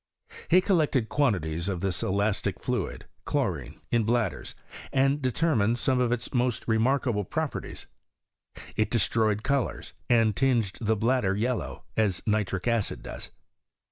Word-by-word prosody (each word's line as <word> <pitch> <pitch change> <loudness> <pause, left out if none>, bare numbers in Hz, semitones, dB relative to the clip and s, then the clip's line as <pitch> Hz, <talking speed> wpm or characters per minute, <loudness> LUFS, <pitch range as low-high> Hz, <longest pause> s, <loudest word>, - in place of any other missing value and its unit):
He 180 +2 +6
col 190 -1 +2
lected 135 -7 +1
quantities 90 - 0
of 90 -3 -3
this 95 -2 -1
elastic 100 +2 0
fluid - - -3 0.2
(chlorine) - - -2
in 120 -1 +3
bladders, 115 -3 -1 0.4
and 135 +2 +2
determined 125 -4 +2
some 130 0 +1
of 125 -1 +2
its 120 -2 -2
most 125 -2 0
remarka 120 +3 +2
ble 105 0 -1
properties: 155 - -4 0.9
it 110 - +1
destroyed 110 -2 +2
colours, 140 -1 -1 0.2
and 115 -3 +4
tinged 120 -7 +1
the 110 0 +2
bladder 110 -3 +1
yellow, 120 +3 -2
as 105 -5 +1
nitric 105 -2 0
acid 115 -3 0
does. - - -6
115 Hz, 140 wpm, -27 LUFS, 105-130 Hz, 0.9 s, He